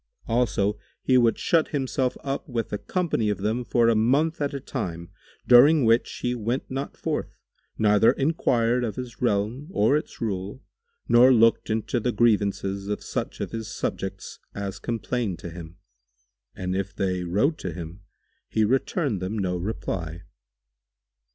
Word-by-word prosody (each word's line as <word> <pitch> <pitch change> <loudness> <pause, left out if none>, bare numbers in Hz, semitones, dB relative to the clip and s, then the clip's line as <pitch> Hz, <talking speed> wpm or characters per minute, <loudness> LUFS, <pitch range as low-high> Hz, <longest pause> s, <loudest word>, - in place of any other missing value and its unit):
Also 105 -3 +1 0.2
he 130 - +3
would 120 -2 +4
shut 165 -2 +2
himself 130 -2 -1
up 140 +1 -4
with 115 -4 -3
a 105 - -1
company 170 - -1
of 105 - 0
them 110 +5 -1
for 120 -1 +2
a 115 - +5
month 140 +9 +2
at 145 - 0
a 140 - -4
time, 85 -11 -5 0.3
during 135 +3 +7
which 115 +1 +3
he 125 - +1
went 120 +3 -3
not 135 +1 -4
forth - - -3 0.4
neither 105 +1 +5
enquired 125 -5 +1
of 110 -3 -2
his 125 -2 -7
realm 115 +5 0
or 125 - +3
its 150 - -3
rule 105 +4 -4 0.4
nor 125 +2 +7
looked 115 -2 +4
into 110 +1 0
the 125 +2 0
grievances 100 -4 +1
of 105 - -3
such - - -4
of - - -3
his 115 -1 -5
subjects - - -4 0.2
as 100 -1 -4
complained 115 -4 -2
to 85 - -8
him; 85 0 -10 0.8
and 90 0 -3
if 95 0 -3
they 95 -3 -1
wrote 105 - +1
to 90 - -4
him, 85 +3 -8 0.5
he 110 -1 +2
returned 130 - 0
them 95 +4 -3
no 90 -3 -1
reply. 85 -3 -4
115 Hz, 155 wpm, -25 LUFS, 100-125 Hz, 0.8 s, during